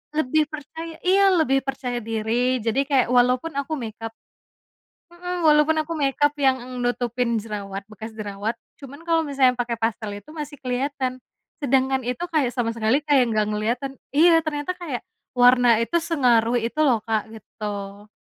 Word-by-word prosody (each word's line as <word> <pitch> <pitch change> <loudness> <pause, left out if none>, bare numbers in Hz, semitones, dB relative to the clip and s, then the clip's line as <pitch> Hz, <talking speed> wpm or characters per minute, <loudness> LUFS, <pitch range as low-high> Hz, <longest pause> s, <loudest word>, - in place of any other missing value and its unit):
lebih 310 +1 +2
percaya 320 +2 -8
iya, 390 +2 +4
lebih 270 -5 +3
percaya 260 -3 -3
diri, 230 +2 -1
jadi 225 +3 0
kayak 270 -4 +3
walaupun 250 +5 +3
aku 295 +3 -3
make-up 225 -3 -7 1.0
hmm, 355 0 -4
walaupun 305 +1 +5
aku 335 - -4
make-up 290 -1 +1
yang 265 -1 +4
eng 250 0 -7
nutupin 245 -1 0
jerawat, 200 -2 -6
bekas 220 +1 -9
jerawat 210 +1 -4 0.2
cuman 280 +4 -11
kalau 330 -1 +2
misalnya 275 -4 +2
pakai 240 -1 -3
pastel 220 -2 -2
itu 300 +10 -13
masih 295 -2 -7
kelihatan. 255 0 -3 0.4
Sedangkan 265 -1 +2
itu 250 +5 -4
kayak 285 -6 +2
sama 235 -1 -2
sekali 225 +3 +2
kayak 270 -5 +3
nggak 215 -1 +1
kelihatan 235 +6 -2 0.2
iya, 330 +3 +5
ternyata 305 +1 -3
kayak 340 -9 -6 0.3
warna 245 -1 +6
itu 230 +9 0
sengaruh 245 -8 +2
itu 235 +5 -3
loh, 265 -6 +4
Kak, 220 -1 -1
gitu. 205 -2 -7
250 Hz, 155 wpm, -23 LUFS, 225-295 Hz, 1.0 s, warna